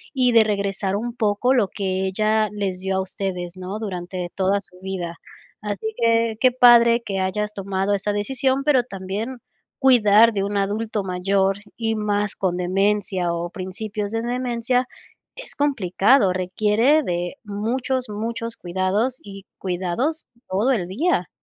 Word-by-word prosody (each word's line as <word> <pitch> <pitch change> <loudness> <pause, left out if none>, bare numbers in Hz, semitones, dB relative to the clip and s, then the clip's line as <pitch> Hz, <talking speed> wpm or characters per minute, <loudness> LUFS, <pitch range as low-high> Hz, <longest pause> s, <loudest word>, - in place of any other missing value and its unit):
y 250 -2 +3
de 225 -1 +6
regresar 200 -2 -1
un 235 +3 -3
poco 220 +3 +1
lo 225 -7 +3
que 190 -1 -2
ella 215 +2 +1
les 195 -3 -3
dio 190 0 -2
a - - +1
ustedes, 185 -2 -4
¿no?, 185 +3 -5
durante 180 -3 -5
toda 195 +1 +1
su 180 -1 -11
vida. 180 -3 -5 0.4
Así 210 +1 -4
que, 230 -1 +2
qué 255 -1 +4
padre 235 -1 +6
que 195 -3 -3
hayas 210 +3 -1
tomado 195 0 -1
esa 200 +1 -1
decisión, 265 +5 0
pero 270 -4 +3
también, 205 +5 -5 0.4
cuidar 230 -4 +6
de 195 -2 -1
un 205 0 -3
adulto 210 +1 -1
mayor, 190 +1 +1 0.2
y 225 -1 -1
más 205 -1 -1
con 185 -2 0
demencia, 185 -1 0
o 170 +1 -3
principios 205 +2 -5
de 225 - 0
demencia, 245 +1 -1 0.5
es - - -8
complicado, 230 -5 +3
requiere 210 +10 +2
de 175 +4 -3
muchos, 245 +5 -2
muchos 230 +2 -4
cuidados 190 +8 -1
y 195 -1 -11
cuidados 190 - -2 0.2
todo 205 +8 +1
el 185 -8 0
día, 330 - 0
205 Hz, 150 wpm, -22 LUFS, 190-235 Hz, 0.5 s, de